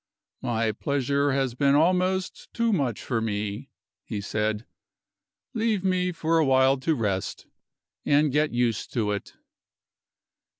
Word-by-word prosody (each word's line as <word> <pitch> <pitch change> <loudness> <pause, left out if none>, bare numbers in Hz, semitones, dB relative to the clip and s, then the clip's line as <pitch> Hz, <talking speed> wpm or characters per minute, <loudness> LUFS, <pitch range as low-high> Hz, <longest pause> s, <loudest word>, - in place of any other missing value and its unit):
"My 115 -3 0
pleasure 140 +4 0
has 135 -2 0
been 140 +2 +3
almost 185 +4 +1
too 230 -1 +2
much 135 - -1
for 115 -3 -1
me," 105 +3 -3 0.3
he 105 - -5
said. 105 +2 -2 0.9
"Leave 220 -4 0
me 180 -1 +1
for 165 -1 +1
a - - +4
while 130 0 +4
to 160 +4 +1
rest, 100 -6 -2 0.6
and 145 0 +3
get 150 +2 +2
used 120 -3 -1
to 110 -4 0
it." 100 - -5
135 Hz, 130 wpm, -26 LUFS, 115-165 Hz, 0.9 s, a